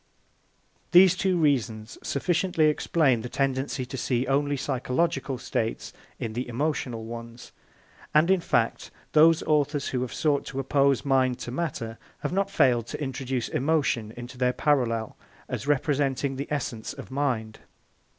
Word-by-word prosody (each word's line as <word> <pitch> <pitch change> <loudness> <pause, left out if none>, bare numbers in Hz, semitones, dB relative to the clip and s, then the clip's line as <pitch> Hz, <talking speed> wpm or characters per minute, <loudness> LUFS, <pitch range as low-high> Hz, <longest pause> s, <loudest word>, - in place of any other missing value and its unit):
These 180 0 +8
two 185 -1 +1
reasons 120 -8 0
sufficiently 175 +2 +1
explain 150 -4 +2
the 125 - -6
tendency 135 0 -1
to 130 - -7
see 125 +1 0
only 140 +1 +1
psychological 135 +2 -1
states 115 -2 -3 0.2
in 110 - -4
the 125 +3 -3
emotional 125 -3 -2
ones; 115 +1 -9 0.6
and, 155 +4 +4
in 190 - +4
fact, - - 0 0.2
those 160 +1 +5
authors 145 -1 +1
who 125 - -1
have 125 - -3
sought 150 -2 +1
to 135 - -4
oppose 140 0 +2
mind 130 -2 +2
to 120 - -5
matter 125 -6 -4 0.2
have - - -2
not 195 +1 +1
failed 125 - +3
to - - -6
introduce 130 -3 -3
emotion 135 -7 0
into 120 +1 -9
their 125 0 +2
parallel 120 -7 0 0.3
as - - -5
representing 140 -1 +1
the 140 +2 -4
essence 125 -6 -3
of - - -10
mind. 125 -6 -2
135 Hz, 145 wpm, -26 LUFS, 125-150 Hz, 0.6 s, These